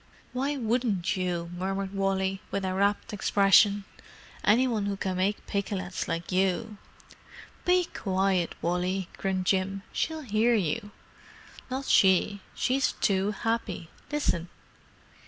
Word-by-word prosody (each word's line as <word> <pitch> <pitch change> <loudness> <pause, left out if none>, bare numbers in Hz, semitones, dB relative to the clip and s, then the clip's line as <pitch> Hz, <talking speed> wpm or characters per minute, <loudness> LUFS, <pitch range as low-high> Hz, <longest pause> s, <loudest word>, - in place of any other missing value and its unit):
'"_ - - -30 0.3
"Why 275 +3 -1
wouldn't 225 -6 0
you?" 175 -2 -2
murmured 195 +2 -3
Wally, 195 -1 0
with 195 -1 -2
a 185 - -1
rapt 200 +3 0
expression. 200 0 +4 0.6
"Any 240 +5 +4
one 215 -5 -1
who 200 -1 -2
can 185 -1 -2
make 195 +3 0
pikelets 190 -2 -3
like 170 +2 -3
you——" 195 +3 0 0.9
"Be 360 0 +4
quiet, 190 - 0
Wally," 180 +2 -1
grinned 190 -1 -1
Jim. 195 +1 0
"She'll 320 -1 -1
hear 230 -1 +2
you." 205 +2 -1 0.8
"Not 265 +2 -3
she—she's 200 +7 +2
too 195 0 +1
happy. 210 -5 -2 0.2
Listen." 180 - 0
195 Hz, 120 wpm, -28 LUFS, 185-220 Hz, 0.9 s, expression